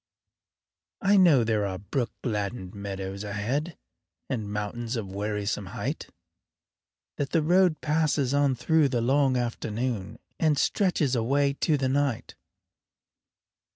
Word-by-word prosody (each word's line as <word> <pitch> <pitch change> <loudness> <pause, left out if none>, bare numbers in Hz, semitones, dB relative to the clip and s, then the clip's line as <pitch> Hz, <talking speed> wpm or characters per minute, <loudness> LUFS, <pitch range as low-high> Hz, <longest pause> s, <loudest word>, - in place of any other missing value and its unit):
I 200 +1 +5
know 165 -10 +6
there 110 -2 +1
are 95 -1 -4
brook 115 +6 -2
gladdened 105 -4 -3
meadows 100 -1 -5
ahead, 120 +11 -2 0.5
And 110 -5 -3
mountains 110 +3 -3
of 105 -5 -4
wearisome 105 0 -2
height; - - -3 1.1
That 140 -1 -2
the 165 - +3
road 175 -1 +3
passes 150 -3 +1
on 140 -2 +3
through 150 +4 +3
the 125 -2 0
long 135 +1 +3
afternoon 115 -2 -3 0.2
And 155 -3 +3
stretches 160 - +1
away 140 +4 +2
to 155 -3 +3
the 135 -1 0
night. 140 -3 0
125 Hz, 120 wpm, -27 LUFS, 105-145 Hz, 1.1 s, know